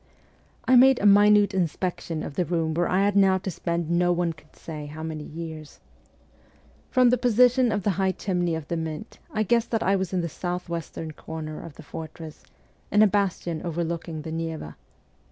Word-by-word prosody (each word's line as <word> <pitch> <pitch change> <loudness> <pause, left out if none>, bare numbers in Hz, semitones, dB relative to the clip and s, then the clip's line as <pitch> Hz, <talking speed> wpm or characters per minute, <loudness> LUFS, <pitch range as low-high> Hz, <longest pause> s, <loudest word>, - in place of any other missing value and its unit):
I 255 - +6
made 260 +1 +7
a - - -1
minute 205 0 +6
inspection 175 -2 -2
of - - -6
the 180 - 0
room 165 -2 -1
where 175 +2 0
I 185 +2 +2
had 205 0 +1
now 195 -1 +5
to 190 0 -4
spend 170 -1 -2
no 175 +1 +3
one 175 -1 0
could 155 -1 -22
say 150 -2 -7
how 155 +2 -8
many 155 -1 -5
years. 160 -2 -8 1.1
From 255 -2 +4
the 250 - +2
position 245 +1 +4
of 205 -2 -1
the 205 - +2
high 190 -1 +2
chimney 175 -4 -1
of 160 -2 -6
the 170 - -2
Mint 160 +7 -6
I 215 - 0
guessed 235 +2 +1
that 225 -1 0
I 195 - +3
was 190 -2 -2
in 185 -2 0
the 170 - -2
south 180 +2 -4
western 165 -1 -5
corner 155 0 -7
of 165 -4 -10
the 160 - -12
o - - -23
fortress, 160 0 -8 0.5
in 210 +1 +6
a - - +7
bastion 185 -5 -1
overlooking 170 -2 -3
the 160 - -6
Neva. 160 - -5
175 Hz, 200 wpm, -25 LUFS, 160-200 Hz, 1.1 s, made